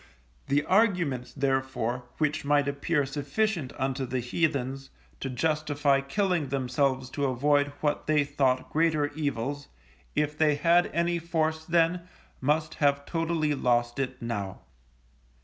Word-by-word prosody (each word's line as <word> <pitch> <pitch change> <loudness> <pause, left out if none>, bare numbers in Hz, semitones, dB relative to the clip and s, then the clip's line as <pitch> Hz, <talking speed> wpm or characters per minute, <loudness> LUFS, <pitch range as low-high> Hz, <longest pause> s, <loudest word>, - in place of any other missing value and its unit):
The 145 +2 +1
arguments, 180 - +2
therefore, 130 -3 -1
which 150 0 0
might 145 0 +2
appear 140 +1 0
sufficient 145 - -1
unto 135 0 -1
the 130 +1 -1
heathens, 135 0 -1 0.3
to 135 - -3
justify 145 0 +1
killing 175 +1 0
themselves 130 0 0
to 145 - -1
avoid 145 +3 +2
what 150 -1 -1
they 150 -1 +3
thought 135 -3 0
greater 155 -2 +2
evils, 145 -1 -3 0.5
if 150 0 0
they 150 -1 +3
had 170 +4 +4
any 170 0 0
force 160 -1 -1
then 170 +1 +1 0.3
must 150 +3 +1
have 140 -1 +3
totally 165 -2 0
lost 120 -1 +1
it 130 -1 -2
now. 100 -5 -4
145 Hz, 130 wpm, -28 LUFS, 135-160 Hz, 0.5 s, had